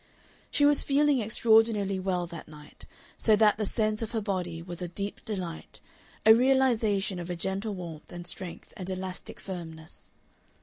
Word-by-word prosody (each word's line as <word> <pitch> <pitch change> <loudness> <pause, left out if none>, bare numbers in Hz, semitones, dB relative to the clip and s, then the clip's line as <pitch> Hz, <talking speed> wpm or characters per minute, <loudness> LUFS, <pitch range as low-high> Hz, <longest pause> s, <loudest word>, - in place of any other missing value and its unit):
She 290 - +3
was 290 0 +5
feeling 285 -1 +3
extraordinarily 220 -3 +3
well 185 -2 0
that 170 -1 -9
night, 150 -1 -8 0.3
so 220 - +5
that 210 0 +4
the 210 - +1
sense 215 0 0
of 225 +1 -4
her 225 - +1
body 185 -5 -2
was 175 0 -7
a 180 - -2
deep 200 +4 -4
delight, 180 -6 -5 0.5
a 220 - +10
realization 230 -6 +3
of 175 0 -6
a 175 - -2
gentle 195 +4 -2
warmth 165 -4 -8
and 175 0 -7
strength 175 -1 -6
and 185 -1 -6
elastic 185 0 -5
firmness. 160 -4 -8
195 Hz, 165 wpm, -29 LUFS, 175-220 Hz, 0.5 s, a